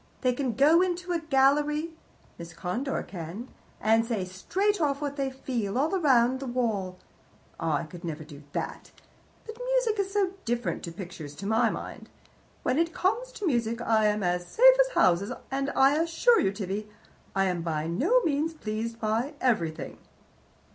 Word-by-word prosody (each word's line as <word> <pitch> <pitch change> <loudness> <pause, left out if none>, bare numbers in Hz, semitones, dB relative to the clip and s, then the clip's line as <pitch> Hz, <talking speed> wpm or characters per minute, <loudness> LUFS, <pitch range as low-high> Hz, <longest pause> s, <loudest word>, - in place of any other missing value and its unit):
They 255 -2 +2
can 255 -2 -2
go 300 - +5
into 365 0 -1
a 345 - +2
picture 315 - -18
gallery 295 +4 +3 0.5
Miss 170 0 -9
Conder 245 +10 -2
can 185 +7 -7 0.3
and 225 +1 +3
say 225 -5 -2
straight 370 - -1
off 280 -2 +1
what 285 -1 -3
they 275 -2 -1
feel, 245 -5 -3
all 295 +4 +1
round 260 -8 +3
the 270 - -5
wall. 215 -7 -1 0.6
I 165 0 0 0.2
never 165 -3 -5
could - - -17
do 145 -1 -12
that. - - -4 0.6
But 445 +1 -9
music - - +1
is 390 -1 -1
so 395 -2 +1
different 240 0 -2
to 170 - -6
pictures, 170 -5 -8
to 195 - -8
my 220 +2 +3
mind. - - -7 0.5
When 270 - +1
it 335 0 0
comes 470 +7 0
to 415 - -5
music 235 -6 0
I 220 -2 +2
am 210 -1 0
as 175 0 0
safe - - +7
as - - +3
houses, 185 +6 +3 0.2
and 275 +1 -1
I 270 +1 +5
assure 335 +8 +3
you, 195 - +2
Tibby, 200 +1 -4 0.5
I 195 0 +3
am 180 -2 -1
by 160 -2 -2
no 310 - +2
means 315 -2 0
pleased 225 -2 -4
by 230 +7 -1
everything. 175 -11 -1
245 Hz, 175 wpm, -27 LUFS, 195-320 Hz, 0.6 s, safe